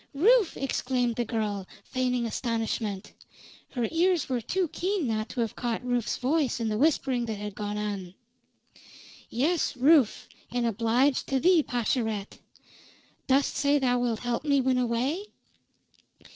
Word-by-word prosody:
"Rufe!" 420 - +4
exclaimed 250 -3 -1
the 240 - -1
girl, 210 -4 -2 0.2
feigning 250 -2 -1
astonishment. 225 -3 -3 0.6
Her 240 -3 -1
ears 345 -1 +2
were 250 -2 -1
too 365 - 0
keen 370 0 -1
not 220 -1 -2
to 245 - -3
have 225 -2 -2
caught 240 0 -3
Rufe's 245 -2 0
voice 275 0 0
in 225 -1 -1
the 215 - -1
whispering 270 -4 +2
that 220 - -2
had 210 0 -6
gone 210 +1 -4
on. 200 -3 -4 1.1
"Yes, 295 +3 0
Rufe, 275 -2 +4 0.2
and 245 0 -1
obliged 235 +5 +1
to 270 - +1
thee, 350 +2 +5
Pascherette. 225 -5 -2 0.9
Dost 270 +1 +2
say 285 0 +3
thou 250 -3 +2
wilt 240 -2 -1
help 245 +1 -2
me 285 -2 +3
win 255 -1 +2
away?" 250 - 0
245 Hz, 145 wpm, -27 LUFS, 225-280 Hz, 1.1 s, thee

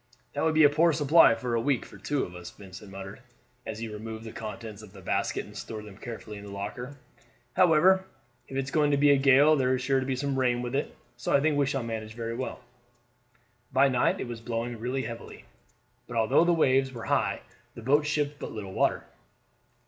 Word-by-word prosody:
"That 145 - -2
would 160 -1 +2
be 155 - +6
a 145 - +8
poor 165 +3 +3
supply 150 -4 +6
for 120 +1 -3
a 115 - +1
week 135 0 0
for 100 - -14
two 135 +8 -1
of 90 - -7
us," 90 -1 -8
Vincent; 100 +1 -12
muttered, 95 +2 -8 0.5
as 110 - -4
he 115 +1 -4
removed 110 +1 -7
the 110 - -7
contents 110 -1 -7
of 105 -3 -14
the 100 - -12
basket - - -1
and - - -14
stored 110 -1 -7
them 105 -2 -11
carefully 110 -2 -8
in - - -11
the 100 - -9
locker; 105 +7 -6 0.6
"however, 185 +2 +5 0.4
if 135 - -6
it's 135 0 -2
going 150 -2 +3
to 145 - +2
be 145 +1 +5
a - - +7
gale 140 +3 +6
there 130 -2 +2
is 130 - -4
sure 135 0 +2
to 130 - -3
be 135 - 0
some 135 0 -1
rain 125 -1 +1
with 120 +1 -4
it, 140 - -2 0.2
so 120 - -3
I 140 - +5
think 150 +1 +2
we 140 -1 +2
shall 135 -2 -1
manage 110 -1 -5
very 115 0 -4
well." 130 +1 -5 1.1
By 135 +2 +4
night 125 -2 +2
it - - -4
was 120 -1 -7
blowing 115 0 -3
really 125 +3 -2
heavily, 115 -1 -8 0.6
but 120 - -5
although 115 +9 +4
the 175 - +4
waves 135 -5 +3
were 120 -3 -8
high - - 0 0.3
the 115 - -9
boat 145 +4 +3
shipped 150 -1 -1
but - - -6
little 100 -3 -7
water. - - +1
125 Hz, 225 wpm, -28 LUFS, 110-145 Hz, 1.1 s, a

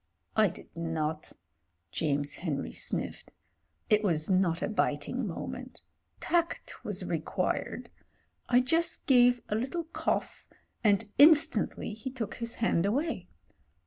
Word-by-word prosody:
"I 215 -1 +5
did 170 - -10
not" 160 -2 -3 0.6
James 145 -2 -1
Henry 150 -6 -3
sniffed. - - -4 0.6
"It 210 0 +3
was 165 -3 +2
not 180 -3 +2
a - - +1
biting 215 - -1
moment. - - -6 0.4
Tact 340 -1 -1
was - - -4
required. - - -2 0.6
I 245 0 +5
just 330 +6 +1
gave 245 -3 +5
a - - -2
little 265 +10 -1
cough, 325 - -3 0.4
and 210 0 +3
instantly 310 -6 +5
he 220 +4 -6
took 245 -5 -4
his 235 -1 -3
hand 200 -5 +1
away. 255 - -1
215 Hz, 120 wpm, -30 LUFS, 170-260 Hz, 0.6 s, I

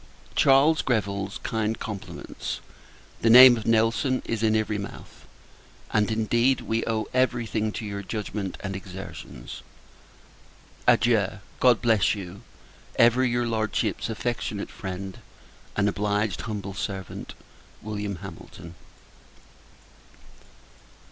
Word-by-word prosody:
Charles 140 +4 +5
Greville's 100 -4 -1
kind 110 0 -1
compliments. 105 -3 -6 0.6
The 115 - +3
name 125 +1 +10
of 115 - -6
Nelson 115 +3 +2
is 115 -2 -2
in 110 -1 +3
every 110 -1 0
mouth; 100 - -10 0.7
and, 105 -1 +3
indeed, 115 +4 +2
we 115 +1 -1
owe 110 -1 0
every 125 -2 +2
thing 110 -1 -1
to 110 - -5
your 100 -1 -4
judgment 100 -1 -4
and 100 -1 -4
exertions. 95 -10 -8 1.3
Adieu! 110 -5 +4 0.3
God 125 -2 +4
bless 110 -3 +3
you. 95 -1 -8 0.5
Ever 120 +2 +5
your 120 -1 +1
Lordship's 110 -1 -1
affectionate 115 -3 -3
friend, 95 -1 -6 0.6
and 105 -1 +2
obliged 105 -1 0
humble 100 -2 -4
servant, 95 -2 -5 0.5
Wm. 105 -1 -3
HAMILTON. 85 -2 -10
110 Hz, 110 wpm, -26 LUFS, 100-115 Hz, 1.3 s, name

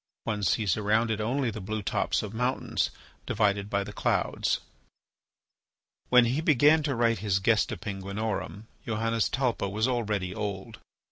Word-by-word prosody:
One 105 -2 -2
sees 100 0 +1
around 110 +2 +2
it 110 -1 -1
only 125 +2 0
the 110 0 -7
blue 105 +2 -4
tops - - 0
of 105 0 -6
mountains, 125 +3 0 0.4
divided 100 -1 +1
by 100 -1 0
the - - -8
clouds. - - 0 1.5
When 125 -1 +7
he 130 +6 0
began 155 0 +5
to 145 -3 -1
write 115 -1 +2
his 100 -3 +1
"Gesta 105 +2 +2
Penguinorum," 100 -1 -4 0.2
Johannes 115 0 0
Talpa 125 -6 0
was 110 +4 0
already 105 -7 -1
old. 105 +1 -5
110 Hz, 145 wpm, -28 LUFS, 100-120 Hz, 1.5 s, When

